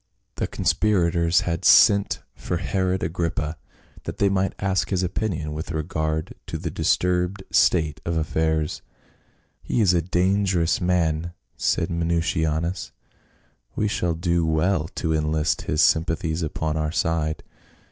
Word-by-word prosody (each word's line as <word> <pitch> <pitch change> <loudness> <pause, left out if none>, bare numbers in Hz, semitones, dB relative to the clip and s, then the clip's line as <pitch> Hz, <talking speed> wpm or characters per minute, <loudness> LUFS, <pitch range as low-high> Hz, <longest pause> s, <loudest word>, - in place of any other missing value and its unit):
THE - - -1
conspirators 85 -4 +2
had 85 -1 -3
sent 100 -1 +5
for 85 - -3
Herod 95 +1 -1
Agrippa 80 -1 -2 0.5
that - - -5
they 100 - +3
might 95 0 0
ask 95 -1 0
his 95 -2 0
opinion 90 -5 -2
with 80 +3 -5
regard 80 -1 -2
to - - -4
the - - -4
disturbed 90 +2 0
state 80 -4 +2
of 85 -1 -2
affairs. 80 0 -1 0.8
"He - - -2
is 100 -5 +4
a 85 - +2
dangerous 90 0 +1
man," 85 -2 0 0.2
said 85 - 0
Minucianus; 85 0 -1 0.8
"we 105 - 0
shall 90 -5 -1
do 85 0 0
well 80 +1 +1
to 80 -1 -1
enlist 75 0 0
his - - +3
sympathies 80 0 +1
upon 80 0 -2
our 75 -1 -1
side." 80 -2 -1
85 Hz, 130 wpm, -24 LUFS, 80-90 Hz, 0.8 s, sent